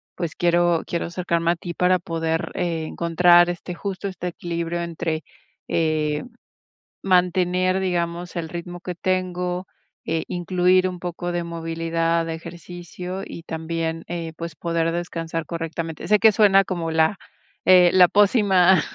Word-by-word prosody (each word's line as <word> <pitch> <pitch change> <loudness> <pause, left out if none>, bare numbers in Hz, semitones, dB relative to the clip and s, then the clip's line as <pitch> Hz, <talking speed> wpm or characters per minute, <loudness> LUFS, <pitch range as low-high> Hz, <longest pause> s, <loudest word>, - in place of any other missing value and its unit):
pues, 170 -3 -4
quiero 175 -1 +2
quiero 170 - -2
acercarme 170 -1 0
a 175 - 0
ti 170 +1 -7
para 180 +1 +3
poder, 165 -1 -2
eh, 165 -3 -1
encontrar, 175 +1 +4
este, 175 0 -5
justo 195 +2 -4
este 185 -2 -5
equilibrio 170 0 -3
entre, 165 -2 -3 0.4
eh, 155 -2 0 0.8
mantener, 185 0 +2
digamos, 175 -1 -2
el 165 -1 -3
ritmo 175 +1 -7
que 180 -1 -5
tengo, 180 0 -2 0.4
e 160 0 -1
incluir 180 +1 +2
un 180 -1 -6
poco 175 0 -4
de 175 0 -2
movilidad, 165 0 -1
de 165 - -3
ejercicio, 175 +2 -8
y 170 - -8
también, 165 0 -3
eh, 170 -2 -4
pues, 170 -1 -6
poder 165 -1 -1
descansar 165 -1 -4
correctamente, 165 -1 -5
sé 210 0 +5
que 220 0 +6
suena 195 -2 +5
como 170 -4 -3
la, 160 +5 +2 0.5
eh, 180 -1 +7
la 180 -1 +7
pócima, 195 -4 +4
175 Hz, 140 wpm, -23 LUFS, 165-180 Hz, 0.8 s, eh